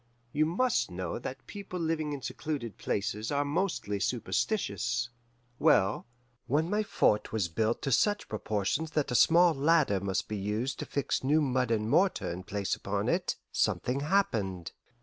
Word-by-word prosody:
You 155 +1 +2
must 230 - +1
know 90 +1 -4
that 130 +2 -7
people 200 -3 -7
living 160 -2 -1
in 140 -3 -5
secluded 140 -8 -4
places 105 +2 -2
are 145 0 +1
mostly 145 - -1
superstitious. 120 - -1 0.5
Well, 95 +4 +3 0.4
when 155 +6 +1
my 210 +1 +2
fort 200 - +1
was 110 -6 0
built 110 +7 0
to 135 - -1
such 205 - +2
proportions 110 +8 -1
that 145 -4 0
a - - 0
small 170 +6 +6
ladder 145 -7 +3
must 95 -1 -2
be 105 - -3
used 105 +6 -2
to - - -4
fix 140 -2 -1
new 145 +4 +3
mud 130 -4 +1
and 110 -2 0
mortar 185 - +2
in 90 +2 -5
place 100 +1 -2
upon - - -2
it, - - 0 0.2
something 125 +2 0
happened. 110 - 0
130 Hz, 160 wpm, -30 LUFS, 105-160 Hz, 0.5 s, small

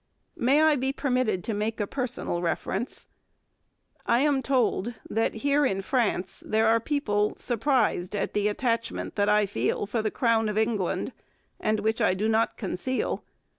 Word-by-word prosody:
May 275 +6 +3
I 310 -2 +5
be 265 +1 0
permitted 255 - 0
to 225 - -2
make 215 +2 -2
a 205 - +1
personal 250 -7 -3
reference? 190 +6 -3 1.0
I 235 +2 +4
am 285 -2 +2
told 245 -3 0
that 225 +1 0
here 285 +1 +3
in 195 -8 0
France 205 -6 -1
there 220 +1 +1
are 225 +1 +4
people 215 -6 0
surprised 230 -6 0
at 205 - -2
the 205 0 +1
attachment 230 +1 -1
that 205 0 +2
I 210 0 +4
feel 200 +1 -1
for 225 +2 -1
the 215 - 0
Crown 225 -1 +1
of 210 - -3
England 220 -4 0 0.5
and 215 -1 0
which 220 +2 0
I 185 - +3
do 210 +3 0
not 225 +1 +1
conceal. 235 +5 -2
225 Hz, 165 wpm, -27 LUFS, 205-255 Hz, 1.0 s, I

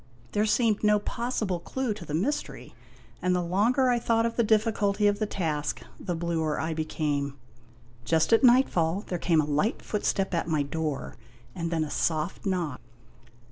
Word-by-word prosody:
There 210 +1 +1
seemed 220 -1 +2
no 210 0 +5
pos 235 +4 -3
sible 180 -5 -2
clue 260 -4 -2
to 205 -4 -10
the 150 - -3
mystery, 280 - -3 0.5
and 180 0 +2
the 180 - 0
longer 225 +9 +2
I 240 - +2
thought 230 0 +2
of 230 - -2
the 235 - +3
difficulty 215 -2 +2
of 205 0 +3
the 215 - 0
task, 155 -7 -2 0.2
the 175 -3 -3
bluer 165 -2 -1
I 160 0 -1
became. 145 -3 -2 0.7
Just 160 - +2
at 225 - +5
nightfall 205 -8 +4
there 180 - -3
came 165 -2 +3
a - - -2
light 150 +10 0
footstep 195 -2 -1
at 170 - 0
my 155 -3 +1
door 150 -1 -4 0.4
and 170 +2 -3
then 165 -2 0
a 150 - -5
soft 160 +5 -1
knock. 175 -8 -2
180 Hz, 180 wpm, -27 LUFS, 160-215 Hz, 0.7 s, no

